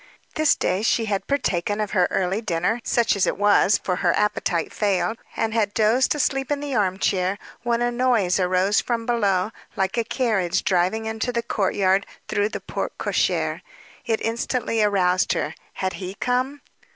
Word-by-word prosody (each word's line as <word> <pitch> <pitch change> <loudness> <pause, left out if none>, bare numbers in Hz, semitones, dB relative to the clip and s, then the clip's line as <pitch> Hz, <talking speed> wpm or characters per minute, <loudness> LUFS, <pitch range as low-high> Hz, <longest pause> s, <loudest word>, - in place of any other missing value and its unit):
This 310 -1 +3
day 185 - 0
she 225 +1 +1
had 200 -2 -2
partaken 205 -7 0
of 210 -2 -2
her 185 -4 +3
early 190 +3 0
dinner 180 +3 0
such 235 -2 +2
as 200 - +1
it - - -1
was, 205 0 +4
for 180 -1 -2
her 175 -2 +1
appetite 180 -5 0
failed 210 +2 0 0.2
and 220 -1 0
had 210 -3 0
dozed 230 +6 +3
asleep 270 -2 0
in 290 - 0
the 285 -1 -4
arm 190 -5 +1
chair, 190 0 0 0.2
when 240 0 0
a 240 - +1
noise 240 -7 +2
arose 185 +3 +2
from 230 -2 -2
below, 205 -4 +1 0.2
like 195 +2 0
a - - +1
carriage 215 -7 0
driving 190 +4 +1
into 220 +2 -2
the 235 -1 -1
courtyard 195 -3 +1 0.2
through 205 +1 0
the - - -6
porte - - -5
cochere. - - 0 0.4
It 225 -1 0
instantly 230 0 -1
aroused 185 -3 +2
her. 150 - -2 0.2
Had 190 -1 -2
he 185 0 -6
come? 255 +5 -1
210 Hz, 175 wpm, -23 LUFS, 190-235 Hz, 0.4 s, was